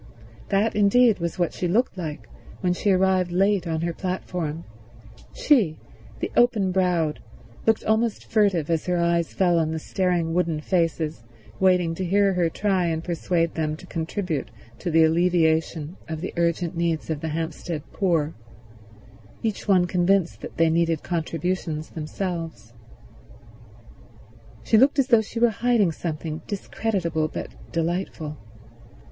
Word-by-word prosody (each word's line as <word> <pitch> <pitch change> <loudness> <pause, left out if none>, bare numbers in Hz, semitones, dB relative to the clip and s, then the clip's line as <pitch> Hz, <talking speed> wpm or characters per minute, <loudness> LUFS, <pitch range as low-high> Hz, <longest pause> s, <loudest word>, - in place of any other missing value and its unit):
That, 205 +2 +1
indeed, 210 +2 +4
was 170 +1 -3
what 175 -2 0
she 180 - -2
looked 225 +8 +1
like 160 -5 -6 0.3
when 180 -1 +2
she 200 - -1
arrived 185 -1 +3
late 190 0 +2
on 160 -1 -1
her 170 0 -1
platform; 175 -3 -4 0.7
she, 215 - +2 0.4
the - - -3
open 220 -6 +3
browed, 180 -5 +1 0.5
looked 225 -1 +3
almost 220 0 +1
furtive 195 -8 +2
as 165 +1 0
her 180 0 +1
eyes 170 -1 +1
fell 175 -3 +3
on 160 -1 +1
the 160 - -2
staring 175 0 0
wooden 170 -3 0
faces 160 - -1 0.4
waiting 180 -3 +3
to 185 - -4
hear 195 +2 +3
her 175 -2 +1
try 190 0 0
and 160 -1 -2
persuade 170 -1 0
them 155 -1 -1
to - - -13
contribute 165 -1 -3 0.3
to - - -3
the 165 0 +5
alleviation 160 -1 +1
of 160 -1 -3
the 185 - -4
urgent 170 0 0
needs 165 -1 -1
of 150 -2 -3
the 160 - -3
Hampstead 160 0 -4
poor, 165 -5 +1 1.1
each 220 -2 -2
one 185 -3 +4
convinced 180 0 +1
that - - -9
they 165 -1 +4
needed 165 -1 +1
contributions 165 -1 -2
themselves. 165 - -5 1.9
She 220 - +4
looked 275 +4 +4
as 270 -2 +2
though 230 -3 +6
she 225 +2 -6
were 240 0 +4
hiding 225 -4 +2
something 160 0 -4
discreditable 185 -6 -1
but - - -6 0.2
delightful. 165 -3 -2
175 Hz, 145 wpm, -24 LUFS, 160-190 Hz, 1.9 s, though